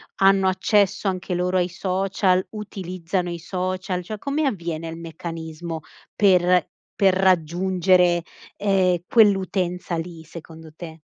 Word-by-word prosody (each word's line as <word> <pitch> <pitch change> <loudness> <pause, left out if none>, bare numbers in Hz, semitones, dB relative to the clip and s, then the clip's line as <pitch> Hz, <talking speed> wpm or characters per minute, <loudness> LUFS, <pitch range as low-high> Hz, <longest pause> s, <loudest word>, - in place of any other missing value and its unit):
hanno 195 0 +4
accesso 200 +1 +1
anche 185 -1 -2
loro 180 +1 0
ai 180 0 +1
social? 185 0 0
Utilizzano 185 -4 -4
i 170 - -5
social? 185 +1 -3
Cioè 215 +4 -6
come 285 +5 -1
avviene 170 -8 -3
il 165 - -7
meccanismo 165 0 -6 0.3
per 180 -3 +3 0.3
per 195 -2 +4
raggiungere, 180 0 +3 0.4
ehm, 190 -3 +2
quell'utenza 190 -5 +2
lì, 165 -1 -6
secondo 160 -1 -12
te? 160 -1 -9
180 Hz, 120 wpm, -23 LUFS, 170-190 Hz, 0.4 s, hanno